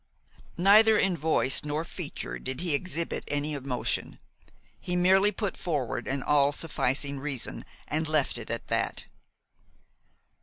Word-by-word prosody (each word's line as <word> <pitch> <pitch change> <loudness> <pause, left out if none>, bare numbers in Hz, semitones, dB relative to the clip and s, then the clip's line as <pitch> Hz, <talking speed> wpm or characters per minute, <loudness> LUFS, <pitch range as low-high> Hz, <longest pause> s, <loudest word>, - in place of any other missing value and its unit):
Neither 210 +4 +6
in 195 -3 +2
voice 155 -4 +2
nor 150 +2 -2
feature 165 -2 -6
did 130 0 -5
he 175 -4 +1
exhibit 170 +2 -1
any 145 +1 -1
emotion. 135 -3 -3 0.6
He 180 - -3
merely 190 +3 +4
put 205 0 -3
forward 135 -8 -3
an 135 0 -2
all 145 -1 +3
sufficing 140 -2 0
reason, 135 -3 -2 0.2
and 155 +1 -1
left 150 -5 +1
it 115 - -9
at 115 0 -4
that. - - -1
150 Hz, 130 wpm, -28 LUFS, 140-180 Hz, 0.6 s, Neither